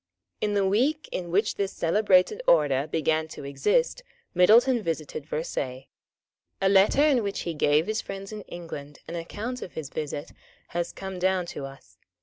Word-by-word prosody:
In 210 -1 0
the 200 -1 +2
week 260 +11 +1
in 175 -2 -4
which 200 +5 +1
this 200 -1 -1
celebrated 185 +1 +3
order 145 -3 +4
began 160 0 0
to 155 - -9
exist 140 - +1 0.3
Middleton 235 +7 +5
visited 155 -4 -4
Versailles. 135 -5 -4 0.7
A 195 - +2
letter 195 +8 +5
in 285 -5 +4
which 200 -2 -3
he 170 - -3
gave 150 +1 +3
his 215 +2 -1
friends 195 +1 -7
in 215 -1 -6
England 150 -4 -8
an - - -7
account 215 +9 -5
of 180 - -8
his 150 -4 -6
visit 150 0 -5 0.4
has 175 0 -2
come 190 -1 -7
down 185 0 +1
to 140 - -5
us. 135 -10 -16
180 Hz, 165 wpm, -26 LUFS, 155-205 Hz, 0.7 s, Middleton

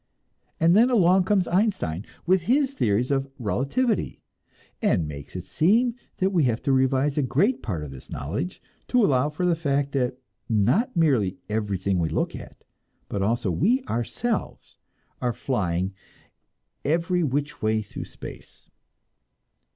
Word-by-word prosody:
And 165 +2 +5
then 235 +4 +6
along 190 -5 +4
comes 195 -3 +2
Einstein, 180 - 0 0.2
with 180 +1 +2
his 275 +1 +3
theories 120 - +1
of 135 0 0
"relativity," 140 - -1 0.6
and 80 - +2
makes 75 +1 -9
it 90 -1 -5
seem 220 - +3 0.2
that 190 +1 +1
we 170 -7 +3
have 120 -2 +1
to 140 - +1
revise 135 +2 +2
a - - +3
great 150 - +1
part 85 -9 -3
of 75 - -7
this 65 -2 -12
knowledge 140 - -4 0.2
to 245 -4 +4
allow 135 -1 +2
for 160 +4 -2
the 175 -1 +3
fact 140 -3 0
that 125 -2 -1 0.3
not 120 - +2
merely 120 - +2
everything 100 -3 -1
we 80 -2 0
look - - -1
at, - - -11 0.5
but 100 - -2
also 110 0 +1
we 225 - +2
ourselves, 220 - -3 0.4
are 125 -1 0
flying 95 -8 -1 0.9
every 170 +4 +1
which 145 +2 -2
way 110 0 +1
through - - -7
space! - - -11
140 Hz, 145 wpm, -25 LUFS, -, 0.9 s, then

